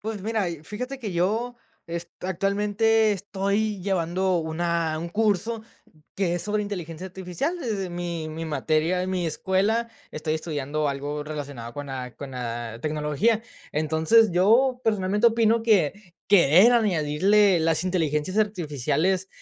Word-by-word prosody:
Pues 215 -2 -5
mira, 215 -4 0
y 165 -3 -7
fíjate 250 +8 -6
que 210 -7 -5
yo 220 +8 0 0.3
es 170 0 -5
actualmente 205 +4 +2
estoy 200 +1 -1
llevando 185 0 0
una 165 0 -1
un 170 - -4
curso 220 +3 0 0.5
que 180 -3 0
es 175 - -3
sobre 210 0 -1
inteligencia 180 -4 -6
artificial, 190 - -4
desde 210 - -3
mi 170 -2 -4
mi 160 +1 -5
materia, 160 +3 0
en 185 - -3
mi 180 -2 -1
escuela 195 +8 0 0.2
estoy 155 0 -2
estudiando 150 -2 -2
algo 145 +2 -3
relacionado 140 -6 -6
con 145 0 -6
la 130 -2 -6
con 140 -2 -8
la 120 -2 -5
tecnología. 155 +9 0 0.3
Entonces, 160 +9 +3
yo 235 +9 +3
personalmente 210 0 +2
opino 230 0 +3
que 200 -3 +1
querer 190 - +6
añadirle 195 -1 +3
las 160 0 +1
inteligencias 170 0 -1
artificiales 180 - 0
180 Hz, 135 wpm, -25 LUFS, 155-210 Hz, 0.5 s, querer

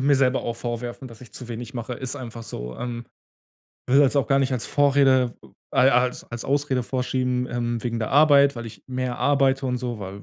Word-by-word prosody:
mir 140 +1 +4
selber 130 -1 +2
auch 115 - -3
vorwerfen, 120 +2 -5
dass 115 -1 -14
ich 125 - -14
zu 125 -2 -9
wenig 120 +2 -7
mache. 120 +1 -4
Ist 130 +1 -5
einfach 115 -2 -8
so, 60 - -7
ähm. 120 -1 -5 0.8
Will 135 +3 +5
das 140 -1 +4
auch 135 -5 +1
gar 135 - +4
nicht 135 -1 +1
als 125 - -1
Vorrede 135 -3 +3 0.4
ai 130 +1 +5
als 125 0 +1
als 120 -1 -6
Ausrede 140 -3 0
vorschieben, 125 0 -1
ähm, 120 -1 -2
wegen 115 -1 -2
der 110 - -3
Arbeit, 140 -1 +6
weil 120 -1 -6
ich 110 -4 -11
mehr 130 -1 -3
arbeite 135 -1 +2
und 125 - -1
so, 120 -3 -4
weil, 100 0 -8
125 Hz, 210 wpm, -24 LUFS, 120-135 Hz, 0.8 s, Arbeit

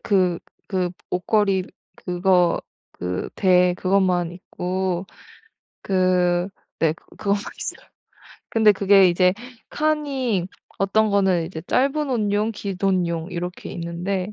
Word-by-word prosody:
그 185 -4 +2 0.3
그 185 -3 0 0.2
옷걸이 190 0 +1 0.3
그거 180 -1 +2 0.3
그 90 +1 -4
대 180 -2 +4
그것만 185 -2 +1
있고 185 0 -3 0.8
그 180 -1 +2 0.3
네. 160 -2 +3
그것만 200 +4 -3 0.2
있어요. - - -6 0.6
근데 220 -2 +5
그게 195 -1 +5
이제 180 +1 +3 0.4
칸이 275 - 0 0.3
어떤 215 +2 +2
거는 190 -4 +2
이제 165 -2 -7
짧은 280 +3 +1
옷용, 210 -2 +1
긴 200 -3 -5
옷용 175 -4 0
이렇게 175 +1 -5
있는데 180 +3 -3
185 Hz, 205 characters per minute, -22 LUFS, 180-200 Hz, 0.8 s, 근데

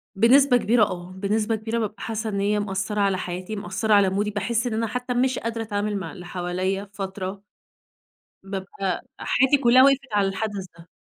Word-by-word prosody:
بنسبة 250 +4 +5
كبيرة 230 0 +3
آه. 180 -2 -3
بنسبة 210 +4 0
كبيرة 220 +2 -3
بابقى 215 -1 -2
حاسّة 225 0 -3
إن 200 -1 -2
هي 210 +1 +1
مأثّرة 205 +1 -2
على 195 -1 +2
حياتي 185 +3 -5
مأثّرة، 205 +3 -1
على 200 -2 +5
مودي. 205 +2 -1
باحس 230 +4 -1
إن 235 - -2
أنا 225 +1 0
حتّى 250 +2 -3
مش 255 +1 +1
قادرة 230 0 -3
أتعامل 205 -1 -2
مع 175 -4 -5
اللي 180 -1 -10
حواليّا 185 +2 -2
فترة. 190 0 -5 1.0
بابقى 195 -1 -4 0.2
حياتي 265 +3 +3
كُلّها 255 0 +6
وقفت 275 0 +5
على 200 -1 +3
الحدث 195 0 -3
ده. 170 - -15
205 Hz, 180 wpm, -24 LUFS, 190-225 Hz, 1.0 s, كُلّها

